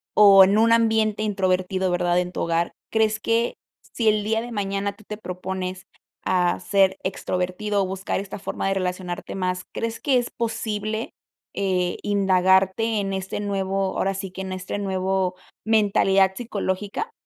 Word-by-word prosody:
o 200 -2 +9
en 195 +3 +4
un 230 +1 +4
ambiente 220 -2 +2
introvertido, 185 -2 0
¿verdad?, 175 0 +2
en 180 0 -2
tu - - -4
hogar, 170 +1 0 0.2
¿crees 220 -1 +2
que 230 +2 0 0.3
si 230 -2 -3
el 210 -1 +1
día 225 +1 0
de 240 +1 -7
mañana 200 -1 -2
tú 215 - -18
te 210 - -5
propones 185 -1 -5 0.4
a 180 -1 +1
ser 190 0 +2
extrovertido, 185 +2 -1
o - - -2
buscar 190 0 -3
esta 200 0 -6
forma 195 - -3
de 195 - +1
relacionarte 180 -1 -3
más, 185 -1 -2
crees 230 0 -3
que 270 -3 +2
es 245 -1 -1
posible, 220 -1 -3 0.4
eh, 185 -2 0
indagarte 195 +2 +3
en 195 -1 -2
este 190 +1 -3
nuevo, 195 -1 -1
ahora 195 - +1
sí 195 -1 -5
que 190 - -7
en 190 -1 -4
este 185 +1 -4
nuevo 190 -1 -1 0.3
mentalidad 195 -3 +3
psicológica? 205 - -3
195 Hz, 160 wpm, -23 LUFS, 185-215 Hz, 0.4 s, o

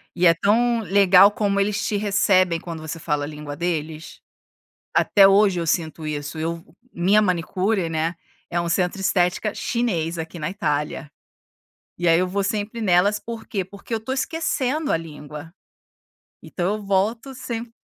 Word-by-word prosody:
e 180 0 +2
é 165 - +7
tão 230 +7 +2
legal 195 0 +6
como 200 -1 0
eles 200 0 0
te 210 - 0
recebem 195 -4 +2
quando 165 -2 -7
você 160 +1 -6
fala 150 -2 -2
a - - -6
língua 150 -1 -7
deles. 160 -2 -4 0.7
Até 195 -1 +5
hoje 195 -2 +4
eu 165 - -3
sinto 160 -1 -1
isso, 145 +1 -4
eu 165 +1 -3 0.3
minha 195 +5 +3
manicure, 185 +1 0
né, 165 +2 -1 0.3
é 175 - -1
um 170 - -2
centro 180 +2 0
de 195 - -3
estética 185 +3 +1
chinês 175 -9 -2
aqui 165 +1 -6
na 150 - -2
Itália, 150 -4 -2 0.9
e 175 - -1
aí 165 0 +5
eu 185 - +1
vou 200 +2 -1
sempre 210 +3 -3
nelas, 200 +2 +3
por 230 0 -8
quê? 195 -3 -2
Porque 200 +5 -10
eu 225 - 0
tô 225 +4 -6
esquecendo 300 0 -1
a - - +2
língua. 150 0 -10 0.9
Então 185 +3 -2
eu 215 - -6
volto 210 +7 0
semp 235 -2 -6
185 Hz, 170 wpm, -22 LUFS, 165-210 Hz, 0.9 s, é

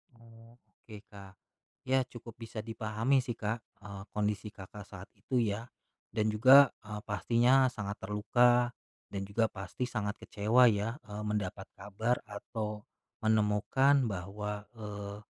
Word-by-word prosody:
Oke 115 -2 -16
Kak, 100 -1 -12 0.5
ya 130 0 +2
cukup 120 -2 -11
bisa 115 -1 -6
dipahami 115 +4 0
sih 120 -2 -3
Kak, 110 +1 -2 0.2
eee, 100 -1 -8
kondisi 105 0 -1
Kakak, 100 +1 -10
saat 95 +1 -10
itu 125 +5 -1
ya, 110 +3 -2 0.5
dan 110 0 +1
juga, 130 +5 +8 0.2
eee, 105 -1 -5
pastinya 120 +5 +3
sangat 105 -5 -5
terluka, 120 +5 +3 0.4
dan 100 - -3
juga 110 +2 +1
pasti 95 +6 -5
sangat 105 -4 -2
kecewa 115 +5 +4
ya, 105 +3 -1
eee, 105 -1 -7
mendapat 100 -2 -3
kabar 105 +5 -1
atau, 105 0 -5 0.4
menemukan 110 +6 +3
bahwa, 105 +1 -4
eee, 100 -1 -6
105 Hz, 130 wpm, -32 LUFS, 105-120 Hz, 0.5 s, juga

